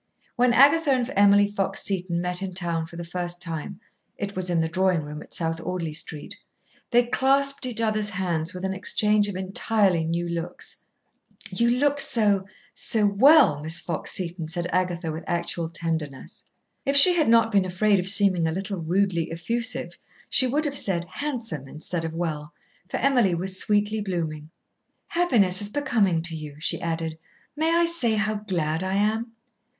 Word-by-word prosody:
When 245 0 +3
Agatha 285 +6 +4
and 255 -1 -1
Emily 205 0 +5
Fox 200 -1 -2
Seton 180 -3 0
met 180 +1 -2
in 190 -2 -5
town 170 -3 -1
for 170 - -13
the 170 - -6
first 175 0 -5
time 170 +2 -6 0.4
it 200 0 -5
was 185 -1 -2
in 175 -1 +1
the 160 - +1
drawing 185 -1 0
room 150 +1 -8
at - - -14
South 165 -1 -3
Audley 170 -3 -4
Street 155 -1 -6 0.5
they 240 0 +4
clasped 275 +2 +1
each 240 -2 -4
other's 215 -2 0
hands 175 -5 -2
with 185 0 -6
an 190 - -2
exchange 205 +2 +1
of 200 - -5
entirely 190 -1 +1
new 170 +2 -2
looks. 170 +1 -5 0.7
"You 235 0 +1
look 285 +4 +1
so 205 -7 +1 0.3
so 215 -2 +2
well, 205 - +5
Miss 160 +2 +1
Fox 170 -3 -3
Seton," 175 -3 -2
said 170 +2 -3
Agatha, 175 -2 -1
with 160 +2 -7
actual 170 -1 -2
tenderness. 160 -5 -5 0.4
If 275 - 0
she 355 +6 +10
had 320 -8 +1
not 230 0 +4
been 200 -3 +3
afraid 195 +2 +1
of 180 +1 +1
seeming 195 -4 +4
a - - -1
little 195 +2 -4
rudely 170 -1 0
effusive 235 +9 -3 0.3
she 260 - +5
would 295 +5 -1
have 280 -2 +1
said 175 -3 -1
"handsome" 230 - -4
instead 165 +4 -5
of 160 0 -5
"well," 150 -3 -4 0.4
for - - -3
Emily 245 -10 +2
was 185 +2 -2
sweetly 210 +1 +1
blooming. 160 -6 -4 0.6
"Happiness 225 - +3
is 205 - 0
becoming 210 - 0
to 165 -1 -3
you," 150 -2 -8
she 155 - -1
added. 165 -1 -4 0.4
"May 315 +2 0
I 340 0 +3
say 290 -10 +3
how 215 0 0
glad 170 -6 -2
I 190 +1 -2
am?" 220 +3 -1
190 Hz, 175 wpm, -24 LUFS, 170-220 Hz, 0.7 s, she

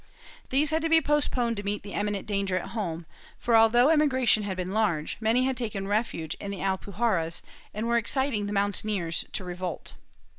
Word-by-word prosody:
These 290 +3 +2
had 320 +1 +1
to 325 - 0
be 325 0 +6
postponed 265 -6 0
to 205 - -4
meet 205 +1 -2
the 200 - -8
imminent 205 -1 -2
danger 200 -2 0
at 185 - -4
home 175 -7 -4 0.3
for, 235 - +1
although 235 +4 +6
emigration 260 -8 +3
had 195 -2 -4
been 185 +1 -3
large, 170 -9 0
many 230 +3 +2
had 265 0 0
taken 210 -5 -4
refuge 205 -7 -1
in 200 - -5
the 200 - -4
Alpuj 195 0 -3
arras 175 -8 +1 0.3
and 215 +2 -3
were 235 0 +3
exciting 235 -2 0
the - - -4
mountaineers 200 -3 0
to - - -2
revolt. 180 -1 -5
210 Hz, 190 wpm, -27 LUFS, 195-240 Hz, 0.3 s, be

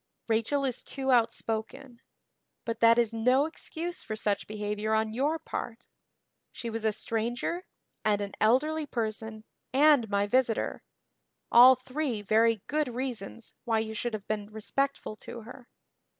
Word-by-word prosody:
"Rachel 230 +5 +1
is 255 -3 -2
too 270 -1 -2
outspoken. 235 +2 -1 0.6
But 230 -1 -3
that 230 0 +6
is 230 -2 +2
no 250 +5 +3
excuse 330 +2 -6
for 215 - -5
such 205 -2 -1
behavior 210 +1 -2
on 220 0 0
your 290 +7 +1
part. 240 -6 -6 0.7
She 235 - -6
was 225 0 -4
a 220 - +3
stranger 240 - -2 0.4
and 210 -1 +2
an 200 -1 -4
elderly 295 +7 +2
person 220 -2 -4 0.3
and 280 -4 +5
my 200 0 +1
visitor 235 +1 +1 0.7
all 250 +2 +9
three 255 -3 -3
very 220 0 +3
good 305 -1 0
reasons 240 -3 -5
why 230 -3 +1
you 220 0 -2
should 230 +1 -3
have 205 -2 -8
been 210 -1 -2
respectful 245 +2 -2
to 235 - -9
her. 245 +2 -12
230 Hz, 145 wpm, -29 LUFS, 220-260 Hz, 0.7 s, all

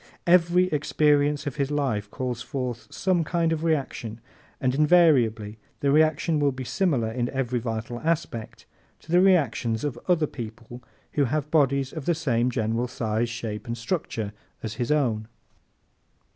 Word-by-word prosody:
Every 175 +1 +5
experience 150 -1 +2
of 145 0 -4
his 140 -1 0
life 130 -9 -1
calls 125 -1 -4
forth 125 -2 -4
some 185 -3 +1
kind 165 0 +1
of 160 0 -3
reaction 135 -8 -2 0.4
and 130 -1 +1
invariably 130 -9 +3 0.2
the 140 -2 +2
reaction 155 +1 +3
will 145 -1 +3
be 130 0 -6
similar, 130 - 0
in 120 +1 -1
every 125 -2 -1
vital 115 +1 -4
respect, 155 -8 -3 0.4
to 160 - -11
the 175 +1 +5
reactions 135 - +2
of 135 -5 -3
other 170 -4 +3
people 120 -2 -8 0.3
who 145 - +2
have 150 +3 -2
bodies 140 -3 +2
of 155 -4 -6
the 170 - +2
same 125 -6 +1
general 115 0 -1
size, 115 -1 -1
shape 115 -3 -5
and 115 0 -3
structure 115 - -3 0.3
as 110 -2 -3
his 120 - 0
own. 115 -8 +1
135 Hz, 155 wpm, -25 LUFS, 115-155 Hz, 0.4 s, Every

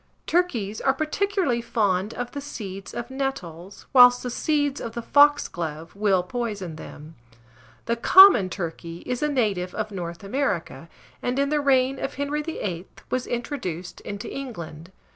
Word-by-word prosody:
Turkeys 240 - 0
are 270 - +2
particularly 310 - 0
fond 205 -3 0
of 245 0 -4
the 285 - -5
seeds 195 -8 -7
of 240 +2 -6
nettles, 200 -10 -5
whilst 245 -1 +7
the 250 - -3
seeds 290 0 0
of 230 - -5
the 235 - -3
foxglove 175 - +2
will 200 -3 +2
poison 200 -5 -4
them. 155 0 -11 0.7
The 235 - 0
common 355 - +8
turkey 170 -1 -6
is 250 -1 -3
a 300 - +1
native 205 -10 0
of 215 0 -3
North 170 -2 -6
America, 190 - -2 0.3
and, 245 +1 -1
in 280 0 +1
the 300 0 +1
reign 270 -1 +2
of - - -4
Henry 285 +2 -2
VIII., 195 - -4 0.2
was 255 0 -1
introduced 230 - -4
into 200 0 -6
England. 170 - -7
235 Hz, 150 wpm, -24 LUFS, 185-275 Hz, 0.7 s, common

